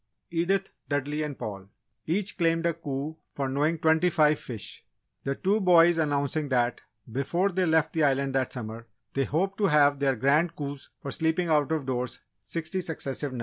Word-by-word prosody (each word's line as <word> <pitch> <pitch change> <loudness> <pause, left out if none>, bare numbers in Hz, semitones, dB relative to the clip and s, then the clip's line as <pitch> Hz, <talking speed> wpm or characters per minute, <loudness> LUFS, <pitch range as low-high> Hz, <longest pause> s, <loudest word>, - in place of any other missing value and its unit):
Edith, 180 +3 0 0.2
Dudley 145 +1 -1
and 150 -3 -4
Paul, 100 -2 -6 0.4
each 190 +5 0
claimed 165 -1 +1
a 170 - +2
coup 150 -1 -5 0.2
for 135 -1 -1
knowing 145 +5 +1
twenty 160 +3 +3
five 155 -2 +3
fish; 115 -5 -8 0.4
the 135 0 0
two 200 +7 +1
boys 175 -2 +6
announcing 145 0 0
that, 120 -2 +1 0.3
before 170 - 0
they 185 -1 0
left 160 -1 +2
the 160 - +2
island 135 -1 +2
that 130 -1 0
summer, 115 -1 -7 0.3
they 135 0 +1
hoped 195 +9 -1
to 205 - +4
have 145 -3 +4
their 135 -2 +2
Grand 150 +7 +2
Coups 140 -2 -6
for 140 - -4
sleeping 165 +2 0
out 150 -2 +2
of 155 -4 0
doors 125 -2 -3 0.2
sixty 165 - -4
successive 145 -4 -3
nights. 125 - -5
150 Hz, 180 wpm, -27 LUFS, 135-165 Hz, 0.4 s, boys